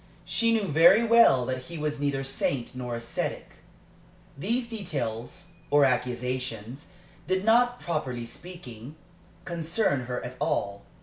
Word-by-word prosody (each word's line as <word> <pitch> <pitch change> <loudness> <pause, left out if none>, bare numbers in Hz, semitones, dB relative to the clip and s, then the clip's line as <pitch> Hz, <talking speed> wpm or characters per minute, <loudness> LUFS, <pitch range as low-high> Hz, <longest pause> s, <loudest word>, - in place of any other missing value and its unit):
She 230 0 +2
knew 225 -2 +2
very 170 +8 +6
well 230 - +6
that 130 0 -3
he 170 -1 -8
was 150 -1 -2
neither 140 -1 -1
saint 135 -2 -2
nor 125 -2 -4
ascetic. 115 0 -4 0.9
These 235 - -1
details 170 - -5 0.2
or 145 0 +5
accusations 125 0 -2 0.4
did 185 +2 0
not, 245 +2 +4
properly 130 -8 -3
speaking, 140 -2 -11 0.5
concern 165 - 0
her 125 -1 -2
at 125 +1 -8
all. 100 0 -1
140 Hz, 125 wpm, -27 LUFS, 125-180 Hz, 0.9 s, very